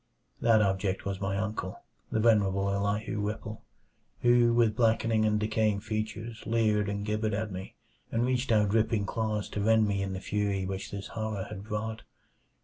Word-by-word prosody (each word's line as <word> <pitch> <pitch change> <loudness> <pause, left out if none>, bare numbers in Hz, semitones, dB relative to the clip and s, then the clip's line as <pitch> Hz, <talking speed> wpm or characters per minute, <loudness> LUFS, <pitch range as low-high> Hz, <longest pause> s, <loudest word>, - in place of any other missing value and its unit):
That 110 -2 +5
object 95 -1 -1
was 100 -1 -3
my 95 0 -1
uncle 105 -3 -3 0.3
the 110 - +1
venerable 100 -3 +3
Elihu 100 +2 -1
Whipple 105 +1 -4 0.6
who 120 -1 +5
with 115 -2 +3
blackening 115 -1 +2
and 105 0 +2
decaying 110 -1 +1
features 110 +1 -4
leered 110 -3 +2
and 100 0 -3
gibbered 105 0 0
at 110 0 -3
me, 95 +1 -7 0.4
and 115 +1 +1
reached 130 0 0
out 105 -2 +4
dripping 110 -1 +2
claws 110 0 -2
to 105 - -3
rend 110 0 +4
me 100 -1 0
in 95 -1 -2
the 95 - -4
fury 100 -1 -1
which 95 0 -4
this 100 -1 -6
horror 110 -3 -3
had 100 -2 -6
brought. 110 +1 -3
105 Hz, 170 wpm, -29 LUFS, 100-110 Hz, 0.6 s, That